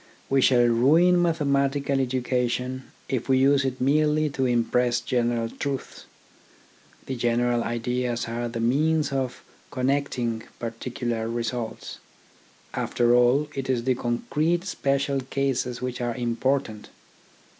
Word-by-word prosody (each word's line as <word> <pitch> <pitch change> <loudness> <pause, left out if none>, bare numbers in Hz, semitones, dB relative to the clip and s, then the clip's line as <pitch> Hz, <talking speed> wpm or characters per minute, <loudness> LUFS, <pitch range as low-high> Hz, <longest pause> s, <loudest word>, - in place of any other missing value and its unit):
We 135 0 +4
shall 125 -1 +5
ruin 155 +10 +4
mathematical 140 -4 +1
education 125 0 -1 0.2
if 130 0 -3
we 130 - +5
use 140 +1 +4
it 130 -1 -2
merely 150 +2 +2
to 135 -1 0
impress 120 0 +1
general 120 -2 0
truths. 140 +3 -5 1.0
The 130 - -4
general 120 0 +1
ideas 120 0 -2
are 120 +1 -3
the 115 0 -5
means 150 +6 +2
of 130 -2 -3 0.3
connecting 130 -4 -1 0.2
particular 115 0 -4
results. 115 -1 -4 0.7
After 120 0 +1
all, 125 +5 +4
it 135 -1 -4
is 125 -3 +1
the 130 +1 +2
concrete 150 +8 -1
special 140 -5 0
cases 130 -2 -2
which 125 -1 -3
are 120 -1 -2
important. 120 -2 -1
125 Hz, 120 wpm, -25 LUFS, 120-140 Hz, 1.0 s, shall